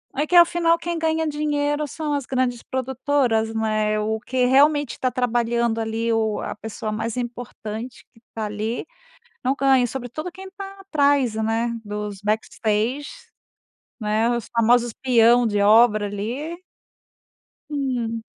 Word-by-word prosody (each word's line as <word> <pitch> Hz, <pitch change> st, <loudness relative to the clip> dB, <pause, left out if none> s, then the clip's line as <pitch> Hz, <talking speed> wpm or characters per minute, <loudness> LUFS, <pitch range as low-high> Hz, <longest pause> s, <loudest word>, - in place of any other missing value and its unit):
É 295 Hz, +3 st, 0 dB
que 355 Hz, -, 0 dB
afinal 340 Hz, -1 st, +5 dB
quem 340 Hz, 0 st, -3 dB
ganha 320 Hz, 0 st, 0 dB
dinheiro 295 Hz, 0 st, -1 dB
são 300 Hz, +1 st, -3 dB
as 280 Hz, -3 st, -2 dB
grandes 255 Hz, -2 st, 0 dB
produtoras, 260 Hz, -3 st, 0 dB
né? 215 Hz, -1 st, 0 dB
O 220 Hz, +1 st, -1 dB
que 250 Hz, +2 st, 0 dB
realmente 285 Hz, +1 st, +4 dB
está 255 Hz, -, -1 dB
trabalhando 235 Hz, -2 st, 0 dB
ali 225 Hz, +1 st, -1 dB
o 220 Hz, -2 st, 0 dB
a -, -, -4 dB
pessoa 215 Hz, 0 st, -5 dB
mais 225 Hz, +2 st, -3 dB
importante 240 Hz, -1 st, -6 dB
que 225 Hz, -, -23 dB
tá 220 Hz, -1 st, -4 dB
ali 215 Hz, +3 st, -3 dB, 0.6 s
não 265 Hz, +2 st, +1 dB
ganha, 265 Hz, -2 st, +4 dB
sobretudo 265 Hz, +7 st, -5 dB
quem 380 Hz, +2 st, -11 dB
está 390 Hz, 0 st, -9 dB
atrás, 285 Hz, -, +2 dB
né, 225 Hz, +2 st, 0 dB
dos 210 Hz, -2 st, -5 dB
backstages, 220 Hz, +5 st, -1 dB, 0.9 s
né, 215 Hz, +1 st, +1 dB
os 235 Hz, -3 st, -4 dB
famosos 235 Hz, +1 st, +3 dB
peão 240 Hz, -1 st, +5 dB
de 205 Hz, -2 st, 0 dB
obra 215 Hz, 0 st, +5 dB
ali. 235 Hz, +11 st, -4 dB, 1.1 s
Hum. 245 Hz, -6 st, -2 dB
240 Hz, 135 wpm, -23 LUFS, 220-285 Hz, 1.1 s, afinal